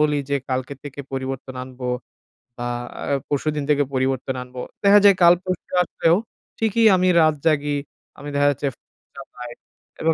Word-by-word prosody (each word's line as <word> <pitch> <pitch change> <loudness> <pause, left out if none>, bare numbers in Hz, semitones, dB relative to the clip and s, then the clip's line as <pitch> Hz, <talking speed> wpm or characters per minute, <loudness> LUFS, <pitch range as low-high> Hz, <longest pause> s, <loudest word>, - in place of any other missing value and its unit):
বলি 150 -1 +2
যে, 140 - +3
"কালকে 130 +2 -2
থেকে 145 -1 -7
পরিবর্তন 130 0 -4
আনব, 130 0 -12 0.8
বা 120 0 -3 0.3
আ - - -4 0.3
পরশুদিন 150 +1 -1
থেকে 145 -1 +4
পরিবর্তন 130 0 -1
আনব" 125 0 -18 0.3
দেখা 200 +1 +7
যায় 200 -1 +8
কাল 170 0 +8
পরশু 185 -1 -5
আসলেও, 165 -1 +2 0.4
ঠিকই 225 +1 +2
আমি 185 0 +2
রাত 155 -1 +4
জাগি, 145 -2 +2 0.4
আমি 145 - -8
দেখা 145 0 +3
যাচ্ছে 140 +1 -3
ফো - - -58 0.3
চালাই, 125 -3 -9 0.5
এবং 160 0 +3
145 Hz, 160 wpm, -22 LUFS, 130-165 Hz, 0.8 s, যায়